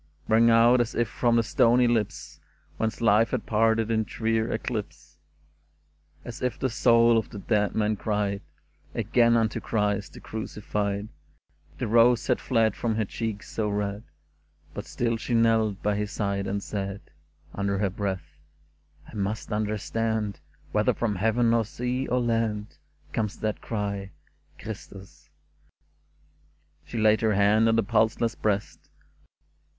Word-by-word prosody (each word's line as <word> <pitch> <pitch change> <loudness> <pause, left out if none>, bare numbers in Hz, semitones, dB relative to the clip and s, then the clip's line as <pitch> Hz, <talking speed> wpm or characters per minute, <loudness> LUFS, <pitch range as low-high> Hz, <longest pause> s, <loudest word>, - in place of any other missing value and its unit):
" - - -35
Rang 115 +1 +5
out 120 +2 +6
as 120 - -3
if 120 - +1
from 120 +2 +1
the 115 - +3
stony 120 +2 +3
lips 115 -4 -1 0.4
Whence 110 +1 -2
life 110 0 +4
had 125 - -2
parted 115 +1 +2
in 110 -1 +2
drear 110 +1 -1
eclipse, 110 -2 -5 1.1
As 120 +2 -8
if 125 -1 -1
the 130 - -1
soul 115 -1 +5
of 110 - -6
the - - -9
dead 105 0 0
man 110 0 +1
cried 100 -1 -1 0.5
Again 120 -1 +3
unto 110 -2 0
Christ 105 -2 -1
the - - -10
Crucified. 105 -1 -4 0.7
The - - -2
rose 115 +2 +4
had 125 - +1
fled 115 -4 +2
from 115 -2 -1
her 110 -1 0
cheeks 110 0 -5
so 105 -2 -1
red. 100 0 -2 0.7
But - - -6
still 115 -1 -1
she 120 +1 -2
knelt 110 -3 +2
by 105 -1 +1
his 105 0 -2
side 100 -2 -2
and 100 0 -2
said. 100 -1 -4 0.5
Under 100 0 -1
her 100 -1 0
breath, 90 -7 -4 0.3
*' 75 0 -31
I - - -14
must 105 +2 -3
understand 110 0 -2 0.3
Whether - - +2
from 105 -4 -1
heaven 115 +3 +2
or 115 -1 +3
sea 125 +4 -3
or 125 - +1
land 115 -3 -1 0.3
Comes 105 -3 -2
that 110 -1 -3
cry, 100 -3 -4 0.2
' - - -37
Christus! 100 -3 -10 0.5
' - - -39
'* 75 +1 -38
She 120 - -6
laid 110 0 +4
her 110 -2 +2
hand 105 +3 +4
on 115 - +3
the 115 - +3
pulseless 110 +1 +1
breast 105 -1 -2
110 Hz, 155 wpm, -26 LUFS, 100-115 Hz, 1.1 s, out